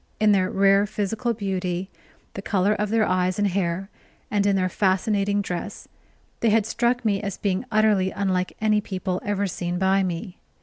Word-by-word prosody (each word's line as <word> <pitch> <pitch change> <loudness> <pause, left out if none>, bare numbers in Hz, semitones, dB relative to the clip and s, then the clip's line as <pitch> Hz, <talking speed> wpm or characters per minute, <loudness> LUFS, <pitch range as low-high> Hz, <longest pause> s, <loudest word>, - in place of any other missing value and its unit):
In 215 0 +4
their 185 -2 +2
rare 195 +1 +3
physical 215 +4 -2
beauty, 190 -2 -3 0.4
the 195 - -6
color 200 0 +1
of 210 -1 -2
their 220 0 +2
eyes 185 0 +1
and 205 0 +2
hair, 185 -1 -1 0.4
and 205 -1 +2
in 200 - +3
their 185 -1 +1
fascinating 200 +2 +1
dress, 185 +3 -5 0.5
they 230 - +2
had 215 -1 +3
struck 240 +2 0
me 200 -2 +1
as 200 -3 -4
being 195 +3 -1
utterly 215 -3 +3
unlike 185 -2 -2
any 215 -1 +2
people 185 -2 -3
ever 205 -1 -1
seen 175 -1 -3
by 190 +1 +2
me. 180 +1 -4
195 Hz, 175 wpm, -24 LUFS, 185-210 Hz, 0.5 s, In